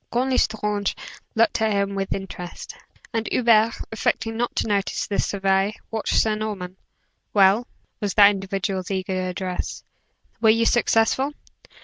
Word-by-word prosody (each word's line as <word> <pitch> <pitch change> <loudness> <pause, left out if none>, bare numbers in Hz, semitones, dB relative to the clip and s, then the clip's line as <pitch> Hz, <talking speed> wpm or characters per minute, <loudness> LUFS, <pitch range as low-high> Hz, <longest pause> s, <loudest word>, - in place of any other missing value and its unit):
Count 255 +2 0
L'Estrange 210 -4 0 0.4
looked 225 0 +2
at 220 -1 +2
him 200 0 0
with 195 -1 -3
interest, 180 -2 -6 0.4
and 225 -1 -1
Hubert, 230 -2 +4 0.2
affecting 225 0 -1
not 240 +1 -2
to - - 0
notice 200 -2 0
the 200 - -3
survey, 195 +1 +1 0.2
watched 220 -1 +1
Sir 220 - +2
Norman. 205 -4 -4 0.6
"Well," 200 +4 +5 0.3
was 205 -3 -2
that 205 -1 +8
individual's 195 -1 -3
eager 185 -1 -2
address, 180 0 -4 0.6
"were 220 - +5
you 230 +1 +4
successful?" 240 +4 +2
205 Hz, 135 wpm, -23 LUFS, 195-225 Hz, 0.6 s, that